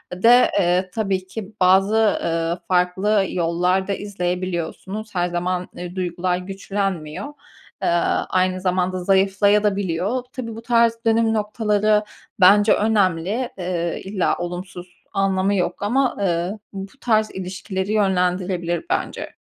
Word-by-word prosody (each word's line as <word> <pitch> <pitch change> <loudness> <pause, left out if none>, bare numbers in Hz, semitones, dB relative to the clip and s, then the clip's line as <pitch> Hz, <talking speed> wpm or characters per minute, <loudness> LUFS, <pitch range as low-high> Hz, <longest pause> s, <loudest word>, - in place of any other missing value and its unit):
de, 235 +7 +5
eee, 180 0 +1
tabii 195 -4 -1
ki 205 +1 -7
bazı, 190 +3 +4 0.3
ııı, 165 +1 -1
farklı 190 +3 +2
yollar 180 +2 0
da 200 - 0
izleyebiliyorsunuz. 185 +2 -4
Her 175 0 +1
zaman, 180 +1 -2
eee, 180 0 -7
duygular 180 0 -1
güçlenmiyor. 195 - -4 0.5
Eee, - - +1 0.4
aynı 185 0 +1
zamanda 185 0 0
zayıflaya 195 +2 +3
da 205 -2 +2
biliyor. 200 +6 -1
Tabii 230 -4 -6
bu 225 - -8
tarz 230 -1 +3
dönüm 225 0 +3
noktaları 210 0 +1 0.4
bence 205 +3 +6
önemli, 205 +2 +1
eee, 175 -2 -2
illa 195 -1 0
olumsuz 175 +1 -6 0.3
anlamı 195 0 +1
yok 180 0 -1
ama, 255 +5 +1
eee, 175 -2 0 0.2
bu 195 0 -7
tarz 220 -2 +2
ilişkileri 190 +1 -4
yönlendirilebilir 180 - 0
bence. - - -2
190 Hz, 125 wpm, -21 LUFS, 180-210 Hz, 0.5 s, bence